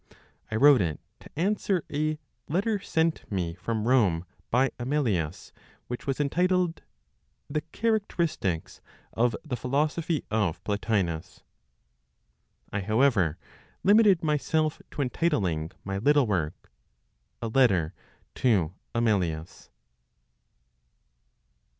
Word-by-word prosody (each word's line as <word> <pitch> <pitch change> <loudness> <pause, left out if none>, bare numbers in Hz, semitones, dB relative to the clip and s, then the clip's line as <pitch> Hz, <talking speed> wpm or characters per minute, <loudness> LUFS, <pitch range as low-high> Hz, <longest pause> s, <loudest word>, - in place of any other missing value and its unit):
I 110 - -3
wrote 140 0 +7
it 80 -4 -1 0.2
to - - -14
answer 195 -1 +1
a 155 +1 0 0.3
letter 200 +6 +1
sent 165 - -1
me 90 -4 -1
from 110 +5 -3
Rome 100 -10 +3 0.2
by 130 +3 +3
Amelius, 115 - -1 0.3
which 125 +2 -6
was 135 0 -1
entitled 180 +3 +1 0.7
"The 150 +1 0
Characteristics 170 - -1 0.3
of 120 0 +2
the 135 -5 -2
Philosophy 150 +6 -1
of 105 -6 0
Plotinos." 95 -5 -2 1.3
I, 105 - 0
however, 110 - +2 0.5
limited 205 -4 +5
myself 155 +1 0
to 145 - -2
entitling 100 - 0
my 95 0 -3
little 145 +4 +4
work, 85 - -2 0.7
"A 115 - -3
Letter 110 -10 +3 0.4
to 95 -10 +2 0.2
Amelius." 90 -9 -1
125 Hz, 100 wpm, -27 LUFS, 95-155 Hz, 1.3 s, wrote